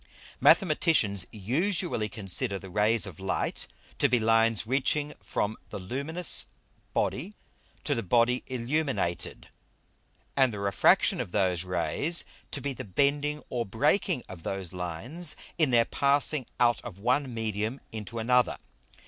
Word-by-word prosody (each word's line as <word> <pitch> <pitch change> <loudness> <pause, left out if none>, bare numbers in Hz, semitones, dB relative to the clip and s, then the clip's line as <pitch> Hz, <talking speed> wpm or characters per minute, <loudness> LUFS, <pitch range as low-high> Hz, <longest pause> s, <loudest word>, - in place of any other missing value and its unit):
_ - - -27 0.4
Mathematicians 155 - +4
usually 130 - -1
consider 100 0 0
the 95 -1 -11
Rays 105 +3 +2
of 95 -6 -9
Light 95 0 -1 0.3
to - - +4
be 125 0 +3
Lines 115 0 +3
reaching 145 +4 0
from 105 +2 -2
the - - -6
luminous 140 - +1 0.4
Body 185 +11 -2 0.5
to 145 - 0
the 115 - -1
Body 120 +5 +2
illuminated, 130 - -2 0.9
and 130 -3 +4
the 105 - -6
refraction 100 0 +3
of - - -6
those 90 -3 +1
Rays 90 - +2 0.3
to - - -4
be 140 0 -3
the 130 - -7
bending 145 +8 0
or 120 -1 -1
breaking 145 - +1
of 95 -3 -10
those 95 0 -5
lines 90 - -2 0.2
in 155 -4 +4
their 120 -2 +4
passing 140 -1 +2
out 120 -1 +3
of 90 - -9
one 125 +6 0
Medium 110 +2 -3
into 110 +1 -7
another. 125 +2 +2
115 Hz, 140 wpm, -28 LUFS, 100-140 Hz, 0.9 s, Mathematicians